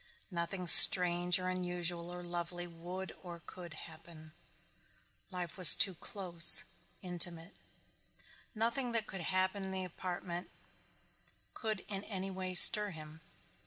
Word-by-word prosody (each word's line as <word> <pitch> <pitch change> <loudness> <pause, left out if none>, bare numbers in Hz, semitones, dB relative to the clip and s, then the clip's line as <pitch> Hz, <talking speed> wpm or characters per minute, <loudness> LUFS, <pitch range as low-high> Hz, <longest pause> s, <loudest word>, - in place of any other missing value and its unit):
Nothing 180 +2 -8
strange 175 0 +7
or 185 0 -8
unusual 175 -1 -5
or 180 0 -12
lovely 175 0 -9
would 175 +2 -11
or 175 -2 -13
could 175 -4 -14
happen. 155 0 -17 1.0
Life 180 -2 -10
was 180 -3 +7
too 190 - +2
close, 175 -1 +2 0.4
intimate. 175 -1 -8 1.0
Nothing 235 +3 -6
that 225 -2 -4
could 190 -2 -11
happen 185 +3 -5
in 190 - -9
the 190 0 -7
apartment 175 0 -10 1.0
could 215 -4 -9
in 200 -1 -7
any 195 -2 -8
way 185 -1 -9
stir 210 +3 +6
him. 155 -2 -15
180 Hz, 125 wpm, -29 LUFS, 170-190 Hz, 1.0 s, strange